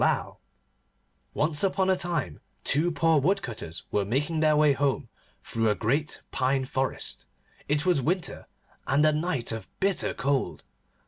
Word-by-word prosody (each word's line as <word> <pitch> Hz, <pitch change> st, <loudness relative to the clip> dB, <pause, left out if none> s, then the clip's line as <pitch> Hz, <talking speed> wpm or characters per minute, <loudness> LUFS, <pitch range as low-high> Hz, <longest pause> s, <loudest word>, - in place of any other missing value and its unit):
ASQUITH] -, -, +1 dB, 1.0 s
ONCE 150 Hz, +1 st, 0 dB
upon 190 Hz, 0 st, +2 dB
a -, -, +4 dB
time 170 Hz, -, -2 dB, 0.2 s
two 160 Hz, +5 st, +2 dB
poor 165 Hz, -1 st, +3 dB
Woodcutters 130 Hz, -, -2 dB
were 105 Hz, -, +1 dB
making 145 Hz, +10 st, -1 dB
their 155 Hz, -1 st, +4 dB
way 150 Hz, -1 st, +5 dB
home 135 Hz, -2 st, 0 dB, 0.3 s
through 115 Hz, -1 st, 0 dB
a 105 Hz, -, +2 dB
great 140 Hz, +9 st, -1 dB
pine 130 Hz, 0 st, +1 dB
forest. 130 Hz, 0 st, -2 dB, 0.4 s
It 150 Hz, +2 st, +1 dB
was 175 Hz, -6 st, +3 dB
winter, 175 Hz, +6 st, -1 dB, 0.4 s
and 145 Hz, +3 st, +3 dB
a 155 Hz, -, +4 dB
night 150 Hz, -7 st, -1 dB
of 115 Hz, -1 st, -5 dB
bitter 195 Hz, -1 st, +2 dB
cold. 140 Hz, 0 st, -1 dB
145 Hz, 145 wpm, -27 LUFS, 130-165 Hz, 1.0 s, way